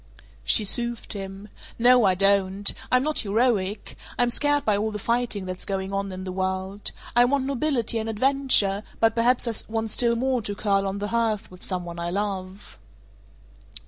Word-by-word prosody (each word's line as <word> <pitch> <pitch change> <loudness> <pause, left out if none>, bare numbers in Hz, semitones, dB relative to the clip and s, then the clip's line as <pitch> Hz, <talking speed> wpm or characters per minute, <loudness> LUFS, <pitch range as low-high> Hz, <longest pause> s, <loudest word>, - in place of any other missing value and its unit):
She 215 - +4
soothed 235 +3 -1
him. 195 +1 -7 0.3
"No, 245 0 +5
I 190 -1 +3
don't. 195 +1 +2 0.2
I'm 255 0 +4
not 305 +1 +1
heroic. 210 -2 0 0.2
I'm 245 0 +2
scared 290 +3 +1
by 210 - +3
all 210 +2 -1
the 210 - -5
fighting 230 -2 -1
that's 185 0 -6
going 195 0 -4
on 195 0 -2
in 185 0 -7
the 185 - -5
world. 190 +2 -2 0.3
I 240 - +6
want 270 +1 0
nobility 265 -4 0
and 220 0 -4
adventure, 225 -4 +2 0.2
but 225 0 +3
perhaps 240 +2 +2
I 230 - -1 0.2
want 225 -1 -1
still 235 0 +3
more 255 +1 0
to 205 -1 -4
curl 200 -1 0
on 195 +1 -3
the 205 +1 -4
hearth 225 -4 -1
with 180 - -14
some 180 -2 -1
one 170 0 -7
I 170 0 -3
love." 195 - -5
210 Hz, 180 wpm, -24 LUFS, 195-240 Hz, 0.3 s, I